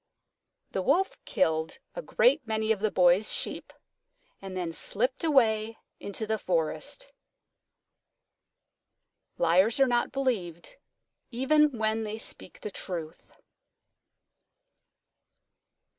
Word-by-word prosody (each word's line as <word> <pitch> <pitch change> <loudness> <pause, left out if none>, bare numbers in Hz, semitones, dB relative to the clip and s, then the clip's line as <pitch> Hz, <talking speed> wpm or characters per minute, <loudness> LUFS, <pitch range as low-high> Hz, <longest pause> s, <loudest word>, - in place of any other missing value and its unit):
The 190 - -2
Wolf 345 - 0
killed 160 - 0 0.2
a - - -5
great 485 - +2
many 220 0 0
of 215 - +1
the 215 +1 0
Boy's 180 +2 +3
sheep - - -4 0.7
and 190 -1 -7
then 170 -2 -3
slipped 250 - +2
away 225 -7 +2 0.2
into 200 +2 -4
the 220 0 -2
forest. 185 - -2 2.2
_Liars 190 +9 +4
are 270 - +6
not 240 -2 0
believed 225 - -3 0.5
even 275 +2 +2
when 220 0 0
they 215 0 -5
speak 220 - -1
the 210 - -6
truth. 170 -4 -7
220 Hz, 100 wpm, -28 LUFS, 185-260 Hz, 2.2 s, are